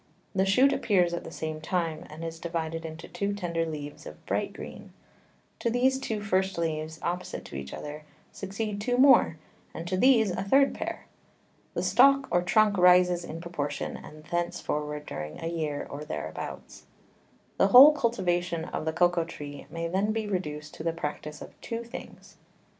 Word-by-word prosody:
The 190 Hz, -1 st, +2 dB
Shoot 260 Hz, +8 st, +5 dB
appears 180 Hz, -9 st, +2 dB
at 170 Hz, -, -3 dB
the -, -, -8 dB
same 155 Hz, -1 st, -5 dB
time, 165 Hz, -1 st, -2 dB
and 155 Hz, +2 st, -9 dB
is 165 Hz, 0 st, -6 dB
divided 165 Hz, -1 st, -3 dB
into 160 Hz, 0 st, -8 dB
two 200 Hz, 0 st, -2 dB
tender 170 Hz, -4 st, -2 dB
Leaves 145 Hz, -2 st, -7 dB
of -, -, -12 dB
bright -, -, -1 dB
Green: -, -, -10 dB, 0.7 s
To 235 Hz, -, 0 dB
these 260 Hz, +3 st, +2 dB
two 220 Hz, -5 st, -3 dB
first 190 Hz, -2 st, 0 dB
Leaves, 160 Hz, -1 st, -2 dB
opposite 180 Hz, +1 st, -3 dB
to -, -, -10 dB
each 70 Hz, 0 st, -6 dB
other, 150 Hz, +1 st, -7 dB, 0.3 s
succeed 200 Hz, +1 st, -4 dB
two 245 Hz, +3 st, 0 dB
more, 260 Hz, -, +6 dB, 0.4 s
and 165 Hz, -, -6 dB
to 185 Hz, -, 0 dB
these 225 Hz, -3 st, +5 dB
a -, -, -2 dB
third 275 Hz, +8 st, +4 dB
Pair. -, -, -5 dB, 0.7 s
The -, -, -1 dB
Stalk 275 Hz, 0 st, +5 dB
or 175 Hz, -, +3 dB
Trunk 210 Hz, +1 st, +3 dB
rises 180 Hz, -1 st, +5 dB
in 165 Hz, -1 st, -7 dB
proportion, 170 Hz, -4 st, -3 dB
and 155 Hz, 0 st, -11 dB
thence 175 Hz, +2 st, -2 dB
forward 150 Hz, 0 st, -3 dB
during 75 Hz, 0 st, -6 dB
a -, -, -6 dB
Year, 155 Hz, -3 st, -2 dB
or 145 Hz, +1 st, -7 dB
thereabouts. 80 Hz, -, -7 dB, 0.7 s
The -, -, +6 dB
whole 260 Hz, +8 st, +10 dB
Cultivation 175 Hz, -, 0 dB
of 160 Hz, -, -4 dB
the 160 Hz, -, -1 dB
Cocao 175 Hz, 0 st, +2 dB
Tree 145 Hz, -3 st, -8 dB
may 165 Hz, 0 st, -3 dB
then 195 Hz, +5 st, 0 dB
be 220 Hz, -1 st, -2 dB
reduced 150 Hz, -7 st, -4 dB
to -, -, -8 dB
the 165 Hz, 0 st, 0 dB
Practice 150 Hz, -1 st, -5 dB
of -, -, -12 dB
two 230 Hz, 0 st, -4 dB
Things. 235 Hz, +2 st, -11 dB
175 Hz, 175 wpm, -28 LUFS, 160-205 Hz, 0.7 s, whole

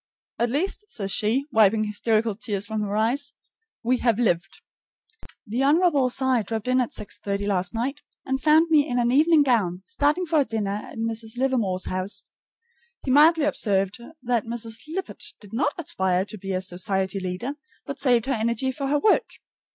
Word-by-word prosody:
"At 235 Hz, +1 st, +1 dB
least," 360 Hz, -, -1 dB
says 195 Hz, -, -2 dB
she, 230 Hz, +8 st, +1 dB
wiping 220 Hz, -1 st, +4 dB
hysterical 215 Hz, +1 st, 0 dB
tears 205 Hz, -2 st, -3 dB
from 220 Hz, 0 st, -3 dB
her 205 Hz, 0 st, -2 dB
eyes, 250 Hz, +7 st, 0 dB, 0.5 s
"we 250 Hz, +2 st, +2 dB
have 235 Hz, -3 st, +1 dB
lived!" 195 Hz, -, -1 dB, 0.8 s
The 230 Hz, +5 st, -2 dB
Hon. 290 Hz, -3 st, +3 dB
Cy 260 Hz, -1 st, +1 dB
dropped 220 Hz, +2 st, -4 dB
in 255 Hz, 0 st, +3 dB
at 245 Hz, -, -1 dB
6:30 200 Hz, 0 st, -3 dB
last 190 Hz, +1 st, 0 dB
night, 270 Hz, +6 st, -2 dB, 0.2 s
and 265 Hz, 0 st, -1 dB
found 315 Hz, +3 st, +4 dB
me 300 Hz, -2 st, +5 dB
in 245 Hz, -, -1 dB
an 240 Hz, 0 st, +2 dB
evening 305 Hz, +3 st, +5 dB
gown, 195 Hz, -9 st, +1 dB
starting 330 Hz, +1 st, +1 dB
for 320 Hz, -2 st, +2 dB
a 280 Hz, -, +3 dB
dinner 210 Hz, -3 st, -2 dB
at -, -, -11 dB
Mrs. 225 Hz, 0 st, -2 dB
Livermore's 235 Hz, -8 st, 0 dB
house. 185 Hz, +2 st, -3 dB, 0.8 s
He 265 Hz, -, -1 dB
mildly 310 Hz, +3 st, +6 dB
observed 200 Hz, -7 st, 0 dB, 0.2 s
that 240 Hz, -3 st, 0 dB
Mrs. 230 Hz, -1 st, -2 dB
Lippett 375 Hz, +5 st, -5 dB, 0.2 s
did 205 Hz, 0 st, -15 dB
not 285 Hz, +5 st, +1 dB
aspire 190 Hz, -, 0 dB
to 215 Hz, -, -8 dB
be 195 Hz, +1 st, -5 dB
a 185 Hz, -, -1 dB
society 190 Hz, +1 st, -2 dB
leader, 185 Hz, +8 st, -4 dB, 0.3 s
but 280 Hz, -, -6 dB
saved 245 Hz, -4 st, +3 dB
her 270 Hz, -, 0 dB
energy 235 Hz, +3 st, 0 dB
for 275 Hz, +1 st, -4 dB
her 290 Hz, +2 st, +2 dB
work. 415 Hz, +8 st, +2 dB
235 Hz, 175 wpm, -24 LUFS, 205-275 Hz, 0.8 s, mildly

